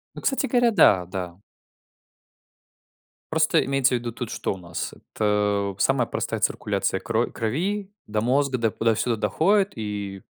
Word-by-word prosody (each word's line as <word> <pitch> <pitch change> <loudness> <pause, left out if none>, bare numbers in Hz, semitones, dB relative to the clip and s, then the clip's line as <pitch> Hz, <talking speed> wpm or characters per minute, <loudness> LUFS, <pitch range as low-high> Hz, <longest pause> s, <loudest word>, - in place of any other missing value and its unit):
Ну, - - -8
кстати 270 0 +1
говоря, 245 -2 +3
да, 95 - +5
да. 90 0 -6 1.9
Просто - - +3
имеется 135 -1 +2
ввиду, 120 -1 -3
тут 120 0 -6
что - - -2
у - - -11
нас? 85 -2 -5
Это 105 -1 -1
самая 135 +2 +2
простая - - -3
циркуляция 95 - 0
кро 115 +2 0
крови 190 - -2 0.2
до 105 0 -2
мозга, 130 +3 +1
да, 115 -2 +1
туда-сюда 115 +2 +1
доходит. 195 - +2
И 100 -3 -5
115 Hz, 140 wpm, -24 LUFS, 100-135 Hz, 1.9 s, да